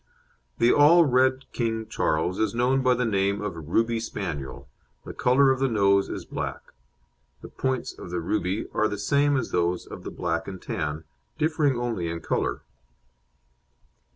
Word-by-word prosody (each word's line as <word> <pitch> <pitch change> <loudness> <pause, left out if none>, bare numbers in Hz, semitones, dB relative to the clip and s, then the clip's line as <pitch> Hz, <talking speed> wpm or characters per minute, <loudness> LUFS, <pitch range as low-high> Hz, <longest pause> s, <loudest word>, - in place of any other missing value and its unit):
The 120 +1 +4
All 165 +4 +6
Red 130 0 +2
King 115 -2 -2
Charles 85 -3 0
is 110 0 0
known 130 +3 +2
by 130 -1 +3
the 125 0 0
name 100 -2 +1
of 105 -4 -4
"Ruby 115 +9 0
Spaniel"; 85 - -5 0.4
the - - -7
colour 135 +2 +4
of 130 - 0
the 135 - +2
nose 100 -4 +3
is - - -5
black. - - -6 0.7
The - - -10
points 130 -2 -2
of - - -8
the 90 0 -2
"Ruby" 95 +3 -1
are 110 - +2
the 105 - -4
same 140 +6 +2
as 130 - -3
those 90 0 0
of - - -10
the - - -5
"Black 85 -1 -3
and 95 -1 -6
Tan," 80 -8 -4 0.3
differing 155 -4 +1
only 115 -8 -2
in 85 0 -4
colour. - - -2
110 Hz, 165 wpm, -25 LUFS, 90-130 Hz, 0.7 s, All